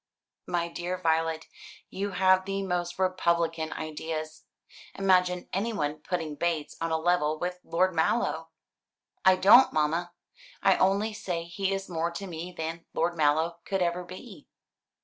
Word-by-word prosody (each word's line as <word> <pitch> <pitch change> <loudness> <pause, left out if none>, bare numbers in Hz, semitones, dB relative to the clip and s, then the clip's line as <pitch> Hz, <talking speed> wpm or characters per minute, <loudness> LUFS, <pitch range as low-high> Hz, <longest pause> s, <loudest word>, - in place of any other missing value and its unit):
"My 170 -1 0
dear 175 +2 -4
Violet, 160 -2 0 0.5
you 200 +1 -3
have 185 0 +4
the 195 0 -2
most 175 -2 -2
republican 170 -3 0
ideas. 155 0 -5 0.5
Imagine 180 -2 +2
anyone 190 -8 -1
putting 160 -1 -3
Bates 155 -1 -2
on 165 - 0
a 160 - +1
level 160 -2 +1
with 180 +2 -3
Lord 185 +2 +1
Mallow!" 170 +9 0 0.7
"I 190 0 +7
don't, 205 +8 +7
mamma. 165 +3 0 0.5
I 195 - +5
only 200 +3 +2
say 180 -5 -3
he 190 +3 -2
is 195 0 -2
more 170 -1 -1
to 195 +3 -5
me 175 0 -6
than 165 0 -5
Lord 175 - +1
Mallow 160 +2 +2
could 195 -2 0
ever 175 +1 -1
be." 195 +8 -11
175 Hz, 145 wpm, -28 LUFS, 160-185 Hz, 0.7 s, I